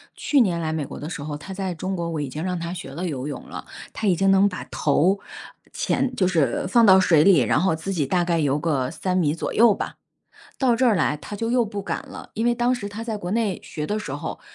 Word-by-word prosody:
去 285 -3 +2
年 180 -7 +1
来 160 -1 -1
美 160 -2 -2
国 - - -9
的 150 - -6
时 165 -5 -6
候， 150 0 -4
她 190 +6 -8
在 190 -2 -3
中 185 +3 -3
国 170 -2 -3
我 155 -2 -2
已 145 - -3
经 150 +5 -5
让 180 -1 -2
她 170 0 -4
学 180 +1 -7
了 180 +2 -4
游 135 -5 -4
泳 145 -3 -7
了， - - -7 0.3
她 220 - -4
已 185 - +4
经 195 +3 +2
能 195 +1 +5
把 180 - -5
头 170 +7 +1 0.5
潜 255 -1 -1
就 185 - +2
是 160 -5 +1
放 230 +5 +5
到 190 -2 +8
水 165 -5 +5
里， 185 -3 +6
然 120 +2 +2
后 185 -1 +2
自 165 +5 -5
己 165 -7 0
大 175 +6 +1
概 170 -1 +1
游 145 -2 +1
个 145 -5 -1
3 180 +3 -2
米 155 -5 +2
左 165 - -4
右 230 -1 +6
吧， - - -5 0.6
到 255 -3 +3
这 255 +2 +2
儿 235 - +5
来 155 -5 +1
她 150 +8 -8
就 225 +1 -2
又 245 -1 +3
不 205 -2 -5
敢 - - -4
了。 - - -11
因 225 - -1
为 240 - +4
当 240 +1 +1
时 205 -5 -6
她 205 +2 -7
在 225 -1 -3
国 185 -3 -5
内 215 -4 0
学 150 -1 -5
的 210 - -1
时 210 -10 -5
候， 145 - -5
180 Hz, 285 characters per minute, -23 LUFS, 155-205 Hz, 0.6 s, 到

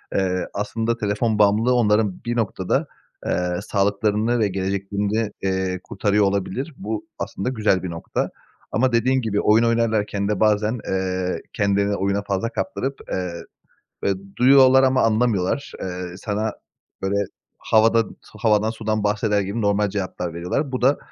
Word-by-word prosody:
eee, 90 -2 0
aslında 115 +3 -1
telefon 105 +1 0
bağımlılığı 105 +4 +4
onların 105 -4 +2
bir 120 0 -1
noktada, 95 -5 0 0.4
eee, 90 0 0
sağlıklarını 105 +3 +1
ve 110 - +3
geleceklerini, 100 +3 -1
eee, 95 -1 -1
kurtarıyor 105 +1 +1
olabilir. 100 - -2
Bu 105 +1 -4
aslında 100 - -3
güzel 110 -7 +1
bir 90 - -3
nokta. 85 0 -3 0.4
Ama 130 +3 +2
dediğin 130 +3 +3
gibi 105 -3 0
oyun 110 +2 +4
oynarlarken 110 -3 +1
de 105 -2 -1
bazen, 110 +2 +2
eee, 95 -1 -1
kendilerini 100 0 +1
oyuna 100 +1 0
fazla 100 +3 -1
kaptırıp, 135 +2 -3 0.2
eee, 90 -1 -2 0.7
böyle, 100 -1 0 0.2
duyuyorlar 130 +1 +6
ama 130 0 +3
anlamıyorlar. 115 +1 +1
Eee, 90 -1 -5
sana, 105 +1 -2 0.5
böyle, 95 +1 -1 0.4
havada 115 +1 +4
s - - -15
havadan 105 0 +3
sudan 110 -1 -2
bahseder 105 0 +1
gibi 100 +4 -3
normal 100 0 +2
cevaplar 95 -3 -4
veriyorlar. 90 - -2
Bu 130 -1 -3
da, 135 +3 +4
105 Hz, 140 wpm, -22 LUFS, 95-115 Hz, 0.7 s, duyuyorlar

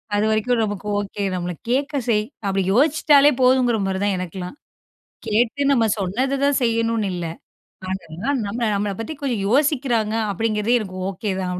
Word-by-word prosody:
அது 205 +1 +2
வரைக்கும் 225 +2 +1
நமக்கு 205 -1 -4
ஓகே. 205 0 -4
நம்மள 180 0 -3 0.2
கேட்க 275 +4 0 0.2
செய் 210 -2 +2 0.2
அப்டி 195 -1 +1
யோசிச்சுட்டாலே 290 +2 +5
போதுங்கிற 250 -2 +4
மாதிரி 190 0 -2
தான் 200 - +1
எனக்கெலாம். 180 - -6 0.7
கேட்டு 235 +6 +1
நம்ம 230 -4 +3
சொன்னது 250 +9 -1
தான் 285 -1 +2
செய்யணுனு 230 -2 +1
இல்ல. 175 -1 -4 0.6
ஆனாலும், 190 - -3
நம்மள, 230 +4 -2
நம்மள 200 0 -1
பத்தி 225 - -4
கொஞ்சோம் 235 -8 -1
யோசிக்கிறாங்க 255 -5 +1 0.2
அப்படிங்கிறதே 225 +2 +1
எனக்கு 185 -3 -7
ஓகே 200 +2 -4
தான் 185 -1 -2
220 Hz, 150 wpm, -21 LUFS, 195-250 Hz, 0.7 s, யோசிச்சுட்டாலே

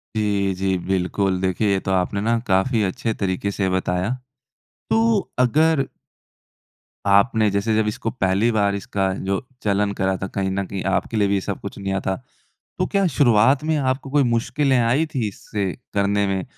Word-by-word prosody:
जी, 100 -2 +1
जी 95 0 0
बिल्कुल। 95 0 0
देखिए 95 +3 +1
ये 95 - +2
तो - - +1
आपने 95 +2 0
ना 115 +2 +2
काफ़ी 105 +4 +2
अच्छे 100 +4 -1
तरीके 100 0 -2
से 95 -1 -1
बताया। 95 +1 0 0.8
तो 225 -1 +3 0.2
अगर 145 +4 +3 1.2
आपने 105 +2 +4
जैसे 100 +3 0
जब 110 -1 +2
इसको 105 +1 -2
पहली 100 +1 +1
बार 100 -2 +1
इसका 95 -1 -1 0.2
जो 100 +6 -1 0.2
चलन 100 0 +1
करा 95 -1 0
था 95 - -4
कहीं 95 0 -2
न 100 0 -1
कहीं 95 0 -5
आपके 95 +4 -2
लिए 100 - +3
भी 100 - +1
ये 95 - 0
सब 100 - -4
कुछ 100 - -7
नया 95 0 -1
था। 95 - +1 0.6
तो - - +1
क्या 195 -1 +1
शुरुआत 130 +2 +4
में 160 0 +1
आपको 130 0 -1
कोई 145 0 +3
मुश्किलें 125 +3 +1
आई 125 +7 +2
थी 120 -5 0
इससे 100 0 -4 0.2
करने 100 0 +2
में, 95 -2 -1
100 Hz, 175 wpm, -22 LUFS, 95-120 Hz, 1.2 s, आपने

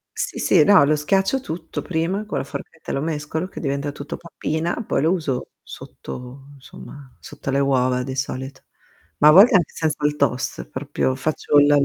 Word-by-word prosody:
Sì, - - -3
sì, 170 -5 +4
no, 200 -7 +7
lo 150 +2 +3
schiaccio 195 - +1
tutto 165 -8 -6
prima, 180 +5 -2
co' 210 - -5
la 135 - -1
forchetta 140 +3 -8
lo 135 - -1
mescolo, 155 +2 -3
che - - -9
diventa 140 0 -2
tutto 145 +3 -7
pappina, 170 +4 -3
poi - - 0
lo 160 - +3
uso 150 -9 -2
sotto 130 +2 -10
insomma, 135 -1 -13
sotto 145 -1 -8
le 135 - +1
uova 130 -2 +1
di 130 +1 -5
solito, 135 0 -4 0.6
ma 150 - +7
a - - +9
volte 200 +7 +8
anche 175 -5 +3
senza 155 -2 -1
il 150 0 +1
toast, 130 -3 -1
proprio 130 -1 -2
faccio 145 +1 0
l 145 0 +6
145 Hz, 180 wpm, -22 LUFS, 135-165 Hz, 0.6 s, a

